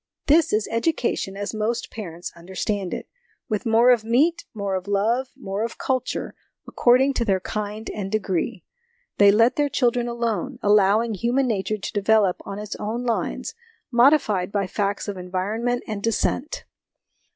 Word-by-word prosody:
This 310 +2 +4
is 215 0 +1
education 230 -6 -1
as 205 +2 -4
most 220 +2 -2
parents 175 -5 -7
understand 190 +2 -3
it, - - -5 0.4
with 215 +2 -2
more 230 +3 +5
of 240 -3 +3
meat, 275 +10 +2
more 200 -3 -3
of 185 +1 -3
love, 220 +6 +1
more 200 -4 -3
of 230 - -4
culture, 260 -1 -2 0.3
according 260 +3 +3
to 240 - 0
their 195 -4 +1
kind 210 +2 -5
and 195 -2 -5
degree. 195 -5 -1 0.6
They 200 -1 +8
let 230 +4 +3
their 290 -1 +2
children 245 -2 +1
alone, 235 +2 -2
allowing 210 +2 +4
human 240 +6 +1
nature 215 -1 -1
to 195 - -6
develop 205 -2 +3
on 200 - -5
its 210 0 -5
own 225 +4 -3
lines, 235 -2 -2 0.4
modified 235 -7 +3
by 200 -1 0
facts 200 +2 -2
of 200 -2 -4
environment 205 +7 -2
and 215 -2 -4
descent. 230 +6 -1
215 Hz, 155 wpm, -23 LUFS, 200-240 Hz, 0.6 s, They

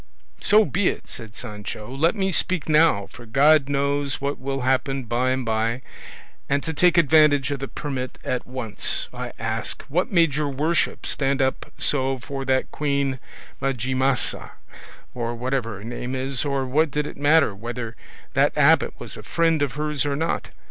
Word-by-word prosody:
"So 215 +1 +5
be 180 +6 0
it," - - -2
said 110 -4 -9
Sancho; 105 0 -7
"let 160 +7 +2
me 190 -2 0
speak 180 -2 +1
now, 155 -10 +4
for 120 +2 -13
God 140 +4 +4
knows 140 0 0
what 140 +1 -2
will 135 +1 -3
happen 130 +1 0
by 120 +2 0
and 130 -1 -1
by; 115 +3 -1 0.7
and 140 0 +1
to 160 - -3
take 175 +3 +3
advantage 150 -4 +5
of 140 - -2
the 135 - -4
permit 130 -4 -5
at 125 - -2
once, 125 -4 -1
I - - -5
ask, - - -3
what 175 +6 0
made 165 -6 +4
your 150 0 -1
worship 155 +5 0
stand 135 -1 +1
up 130 0 -1
so 135 -2 0
for 135 +2 -6
that 130 0 +1
Queen 140 -3 -1 0.4
Majimasa, 130 0 0 0.6
or 120 -1 -3
whatever 125 -2 -2
her 100 - -11
name 120 +2 -5
is, 130 0 0
or 140 -2 -1
what 150 +5 +2
did 150 +2 -1
it - - -7
matter 145 -4 +4
whether 115 +2 -6 0.4
that - - +2
abbot - - +4
was - - -6
a - - -9
friend 165 -2 +1
of 145 -3 0
hers 150 -1 -1
or 145 -1 -1
not? 160 +3 -2
135 Hz, 175 wpm, -23 LUFS, 125-150 Hz, 0.7 s, So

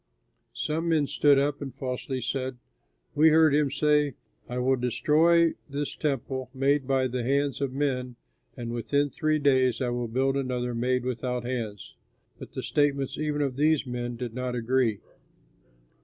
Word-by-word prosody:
Some 160 +2 -2
men 155 -3 +3
stood 145 0 +3
up 145 +1 0
and 135 -3 -6
falsely 130 0 -4
said, 130 +1 -3 0.6
"We 155 +2 +6
heard 160 -1 +5
him 145 -1 +3
say, 150 -1 +2 0.3
'I 125 - -4
will 130 +1 +2
destroy 160 +7 +3 0.2
this 145 +1 -3
temple 130 -3 -2
made 135 0 +1
by 135 -1 +2
the 125 0 -3
hands 140 +3 0
of 140 -2 -1
men 130 -3 -2 0.4
and 120 -1 -5
within 140 +4 0
three 155 -1 +1
days 130 -4 +2
I 125 -2 0
will 120 0 -2
build 135 +4 0
another 125 -2 -2
made 125 +1 0
without 125 0 -2
hands.'" 115 -5 -4 0.5
But - - -10
the - - -5
statements 140 -2 0
even 150 -1 0
of 135 -2 -3
these 155 0 +2
men 120 -1 -4
did 120 -1 -5
not 125 0 -3
agree. 120 -3 +1
130 Hz, 160 wpm, -27 LUFS, 125-145 Hz, 0.6 s, We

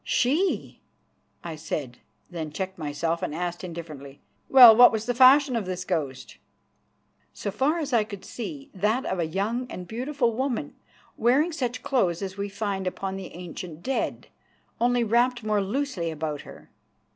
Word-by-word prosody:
"She!" 310 +10 0 0.6
I 165 -2 -5
said, 145 -5 -5 0.3
then 160 -3 -5
checked 190 +3 -5
myself 160 +2 -2
and 150 - -3
asked 175 +1 -4
indifferently: 155 -6 -8 0.3
"Well, 245 -4 +10
what 245 +2 +8
was 220 -1 -2
the 245 - 0
fashion 260 +2 +6
of 215 -5 -2
this 185 0 -4
ghost?" 140 -8 -3 1.0
"So 200 - -4
far 270 - +1
as 295 -5 -3
I 230 -3 +4
could 205 -3 -9
see 280 +3 -7
that 215 +6 0
of 190 - -2
a 165 - 0
young 220 +9 -2
and 180 -1 -7
beautiful 245 +2 -1
woman, 265 +3 -2 0.4
wearing 270 +9 +3
such 250 -5 -3
clothes 190 -9 0
as 190 -1 -5
we 200 0 -4
find 195 -2 -3
upon 190 +1 -3
the 190 -3 -8
ancient 175 -2 -8
dead, 270 - -2 0.5
only 245 0 +2
wrapped 240 +2 +2
more 210 -1 +1
loosely 205 -4 -2
about 155 -2 -4
her." - - -14
205 Hz, 160 wpm, -26 LUFS, 175-250 Hz, 1.0 s, Well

